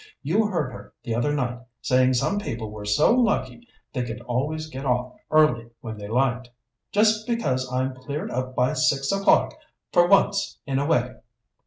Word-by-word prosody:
You 200 +10 +2
heard 165 -10 -2
her 125 - -12
the 115 - -3
other 120 +6 0
night 125 -4 -2 0.2
saying 130 0 +3
some 200 +11 +1
people 115 - -5
were 105 -1 -8
so 105 - +4
lucky 240 0 0 0.3
they 125 -3 -1
could 120 -1 -6
always 140 +6 -2
get 135 -3 -7
off 125 -1 0 0.2
early 135 -7 +3
when 110 -1 -6
they 100 - -7
liked. 125 +1 0 0.4
Just 215 +1 +3
because 130 - -1
I'd 130 +1 -1
cleared 140 +4 -5
up 130 +1 -3
by 125 +1 +2
six 135 -1 +1
o'clock, 195 0 +3 0.4
for 175 0 +5
once 195 +1 +3
in 135 -1 -1
a 140 - -1
way!" 125 -5 +1
130 Hz, 175 wpm, -24 LUFS, 125-160 Hz, 0.4 s, for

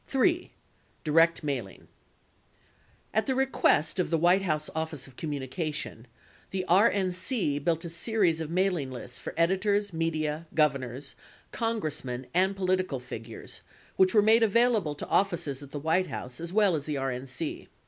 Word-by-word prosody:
54 270 - -1
3. 350 0 +1 0.5
DIRECT 165 +2 +3
MAILING 130 -10 -4 1.3
At 220 - +1
the 265 - +1
request 260 - +2
of 180 - +1
the 165 - +2
White 175 +4 +4
House 155 -5 -1
Office 160 -4 -3
of 135 - -14
Communication, 150 - -4 0.4
the 185 -1 -3
RNC 185 - +2
built 165 +1 0
a - - -4
series 170 -2 +1
of 155 - -4
mailing 180 -5 +1
lists 125 -1 -7
for - - -7
editors, 200 +3 +2
media, 160 -1 -1
governors, 140 -3 0 0.4
Con 230 -1 -1
gressmen, 130 -7 -4
and 190 +3 +2
political 185 -6 0
figures 115 -2 -8 0.3
which 190 +2 +4
were 210 - +6
made 220 +2 +6
available 225 -7 +3
to - - -6
offices 170 -8 0
at 140 - -10
the 145 - -6
White 165 +5 +1
House 125 +3 -6
as 170 0 -5
well 205 -3 +4
as 145 -2 -3
the 150 -2 -2
RN 135 -1 -3
C. 150 +4 -4
165 Hz, 160 wpm, -28 LUFS, 145-195 Hz, 1.3 s, were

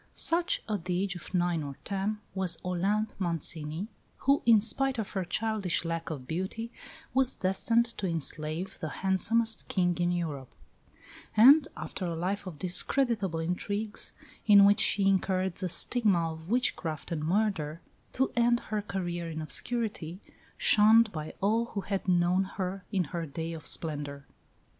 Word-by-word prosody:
Such, 345 +1 +1
at 205 -6 -3
the 180 -1 0
age 195 -1 -1
of 175 - -9
nine 175 -3 +1
or 140 -2 -6
ten, 205 +2 -2
was 185 -4 -1
Olympe 200 +4 0
Mancini, 165 0 -2 0.3
who, 275 +1 +2
in 225 -2 +8
spite 260 +5 +1
of 220 -3 -3
her 190 -2 -2
childish 205 -2 -1
lack 165 0 -3
of 140 -5 -6
beauty, 190 - -4 0.4
was 260 0 +4
destined 230 +5 +1
to 195 - -1
enslave 160 +1 -3
the 155 - -4 0.2
handsomest 225 +4 +1
King 180 -2 +1
in 175 0 +2
Europe; 155 -7 -4 0.8
and, 275 +7 +8
after 185 - -5
a 170 -1 -2
life 190 +4 -2
of 170 -5 -7
discreditable 195 - +1
intrigues, 200 +5 -2 0.4
in 200 -2 +8
which 205 0 +5
she 195 -1 +2
incurred 190 -2 +1
the 185 -2 -3
stigma 185 -5 +2
of 160 +2 -10
witchcraft 170 - -1
and 155 -3 -2
murder, 165 -4 0 0.3
to 265 - +1
end 240 0 +3
her 215 -1 0
career 175 -4 -4
in 160 -1 -5
obscurity, 185 - -2 0.4
shunned 220 +1 +5
by 155 -3 -6
all 220 +4 +2
who 210 -4 -5
had 195 -1 -3
known 180 +1 +3
her 190 0 -4
in 190 -4 +1
her 170 -2 -3
day 160 +3 -5
of 160 -2 -2
splendour. 145 -3 -2
185 Hz, 155 wpm, -29 LUFS, 165-215 Hz, 0.8 s, in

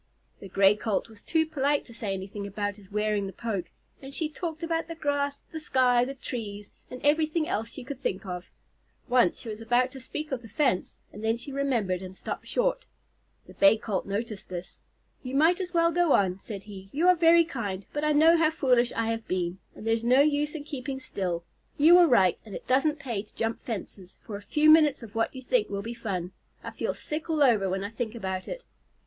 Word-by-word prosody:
The 195 - -9
Gray 195 +2 +5
Colt 215 0 -2
was 220 -2 -15
too 320 -1 +1
polite 290 -2 0
to 235 - -13
say 210 -3 -4
anything 195 +2 -5
about 205 0 -3
his 200 -2 -17
wearing 210 -1 0
the - - -6
poke, 210 -6 -3 0.3
and 270 0 -9
she 315 +2 -2
talked 320 0 -5
about 330 0 -1
the 330 - -6
grass, 285 -2 -1
the 320 - -5
sky, 255 -5 +3
the 275 +2 -6
trees, 210 -6 -6 0.2
and 250 - -7
everything 310 +2 +2
else 225 +2 -2
she 265 - -8
could 270 +1 -7
think 190 -5 -2
of. 180 -1 -5 0.6
Once 245 -8 +3
she 230 - -7
was 215 +1 -6
about 245 +3 +2
to 265 - -9
speak 300 +4 -6
of 260 -2 -2
the 230 - -11
fence, 260 - 0 0.2
and 210 - -9
then 225 +1 +1
she 260 +4 -8
remembered 240 -10 0
and 185 0 -8
stopped - - -6
short. - - 0 0.6
The - - -14
Bay 200 +2 +5
Colt 210 -4 -3
noticed 205 0 -4
this. 180 0 -7 0.4
"You 255 0 -5
might 320 +5 +5
just 375 -2 -3
as - - -25
well 335 0 +4
go 345 -2 +3
on," 190 -2 +2
said 200 -1 -7
he. 195 -2 -11
"You 325 +6 +1
are 365 - +7
very 335 0 +6
kind, 200 - -4
but 295 - -2
I 305 - +3
know 315 +3 +6
how 320 -1 +4
foolish 250 -6 +2
I 230 - 0
have 225 0 -4
been, 180 0 -2 0.2
and - - -10
there's 225 0 +1
no 250 +3 +5
use 295 +1 +1
in 300 - -5
keeping 275 -2 -5
still. 180 -9 -3 0.3
You 315 +4 +7
were 355 -1 +8
right, 190 - +4
and 210 -4 -9
it - - -8
doesn't 295 +4 +2
pay 240 -8 -3
to 210 - -20
jump 225 0 -2
fences 195 -4 -6
for 210 - -6
a 200 - -6
few 300 +9 +2
minutes 305 -4 +6
of 215 -3 -10
what 225 +3 -1
you 260 - -7
think 465 - +1
will 200 0 -3
be 230 +2 -5
fun. 195 -6 -4 0.3
I - - -6
feel - - -3
sick 305 +2 -5
all 310 -2 +3
over 215 -7 +4
when 190 +1 -2
I 200 - -4
think 225 0 -4
about 190 -4 -4
it." - - -6
240 Hz, 230 wpm, -27 LUFS, 200-300 Hz, 0.6 s, were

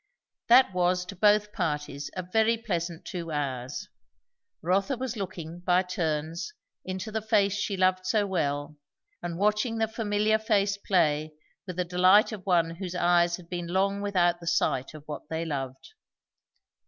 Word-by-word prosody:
That 245 -3 +6
was 180 0 +1
to 195 - -8
both 210 +2 +3
parties 150 -6 -3
a 185 - -3
very 220 +5 +2
pleasant 175 -6 -3
two 170 -2 -5
hours. 130 -4 -3 0.8
Rotha 195 - +1
was 255 -1 -3
looking, 175 -5 -6
by 180 +1 +2
turns, 165 - -3 0.3
into 185 +3 -5
the 220 0 -2
face 205 -3 +2
she 205 -1 -2
loved 185 0 +2
so 210 +1 +2
well 150 -5 -2 0.4
and 170 -1 -4
watching 210 +4 +1
the 220 0 +1
familiar 215 0 +1
face 205 -2 +1
play, 155 -6 +1 0.3
with 180 - -5
the 180 0 -1
delight 185 +5 +5
of 210 -4 -7
one 170 -3 +3
whose 185 -1 -5
eyes 175 -1 +3
have 175 -2 -14
been 175 -1 -4
long 195 +3 0
without 175 -4 +2
the 170 - -10
sight 130 -3 0
of 150 - -10
what 150 - -7
they 160 +1 -2
loved. 135 - -5
185 Hz, 160 wpm, -28 LUFS, 165-205 Hz, 0.8 s, That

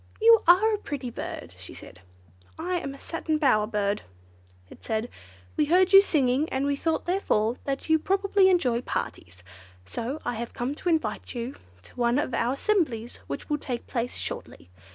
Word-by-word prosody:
"You 455 0 +7
are 400 +6 +6
a 420 - -1
pretty 275 - -5
bird!" - - -7
she - - -9
said. 95 - -12 0.6
"I 355 +2 -1
am 275 -3 -6
a - - -14
Satin 320 -2 -2
Bower 235 -8 +3
Bird," 210 -1 -1 0.7
it - - -15
said. 220 +2 -2 0.5
"We 300 - +2
heard 365 +5 +3
you 390 - +11
singing, 285 -5 +1
and 265 +1 -1
we 285 0 +1
thought, 320 +3 -1
therefore, 250 - +1
that 275 -1 -3
you 320 0 +4
probably 390 +2 +3
enjoy 255 -10 +2
parties, 90 - -5 0.4
so 240 - -4
I - - -1
have 235 +1 -6
come 245 +3 -2
to 350 +4 -3
invite 270 -8 -1
you 240 +3 -4 0.3
to - - -18
one 240 0 +2
of 275 -4 -1
our 235 +2 +1
assemblies 275 - 0
which - - -5
will 295 -1 -1
take 245 -4 -4
place 245 -1 -3
shortly. 90 - -6
275 Hz, 180 wpm, -26 LUFS, 235-345 Hz, 0.7 s, you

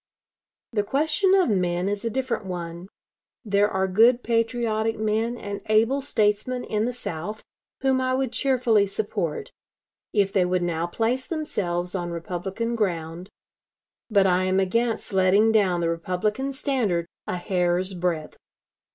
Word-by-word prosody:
The 215 -3 +1
question 310 - +2
of 370 - +3
men 180 -1 0
is 205 +1 -2
a 230 - 0
different 240 -4 -2
one. 175 0 -6 0.6
There 205 0 +3
are 190 -1 0
good 230 +6 +4
patriotic 230 -1 0
men 220 +3 0
and 205 -2 -6
able 225 +6 +3
statesmen 245 0 0
in 215 +1 -1
the 245 - -1
South 210 -3 -6 0.4
whom 265 -1 +2
I 255 0 +1
would 260 -2 -1
cheerfully 245 -6 +2
support, 195 -5 -3 0.6
if 200 -2 +1
they 190 - +4
would 180 0 0
now 170 -1 -1
place 235 +8 -1
themselves 180 - -2
on 175 -2 -2
Republican 185 +7 -3
ground, 175 -3 -2 0.8
but 200 -3 +4
I 185 0 +3
am 185 +1 +2
against 225 +3 0
letting 190 +4 +4
down 190 -5 +2
the 165 - +1
Republican 185 +10 -1
standard 245 - 0 0.2
a 180 - -2
hair's 180 0 0
breadth." 175 -3 -2
205 Hz, 145 wpm, -25 LUFS, 180-235 Hz, 0.8 s, good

